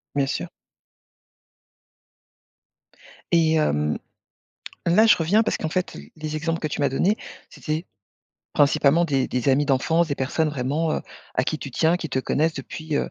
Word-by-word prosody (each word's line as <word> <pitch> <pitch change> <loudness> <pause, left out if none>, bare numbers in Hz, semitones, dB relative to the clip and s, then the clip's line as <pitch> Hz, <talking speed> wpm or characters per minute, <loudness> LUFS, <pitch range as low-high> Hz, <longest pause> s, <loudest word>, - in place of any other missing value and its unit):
Bien 140 -1 +2
sûr. 90 -10 -3 2.8
Et 165 -2 +4
hem, 75 - +1 0.9
là 195 +7 +5
je 225 - +6
reviens 185 +7 +3
parce 220 - 0
qu'en 160 - -3
fait 185 +3 -2
l - - -11
les 155 0 -4
exemples 165 +1 -1
que 155 - -2
tu 150 - -4
m'as 140 - +3
donnés 180 +10 +1 0.3
c'était 155 +3 -4 0.7
principalement 145 +3 +4
des 135 -5 +1
des 125 +1 -1
amis 140 +2 +3
d'enfance, 160 +5 +2
des 140 - -1
personnes 145 +4 0
vraiment, 150 +3 -1
heu, - - -3 0.3
à 130 - +1
qui 155 - -2
tu 140 - -7
tiens, 160 +6 +2
qui 165 - -5
te 130 - -1
connaissent 155 +4 0
depuis, 150 +2 -5
heu, - - -1
155 Hz, 165 wpm, -23 LUFS, 135-165 Hz, 2.8 s, je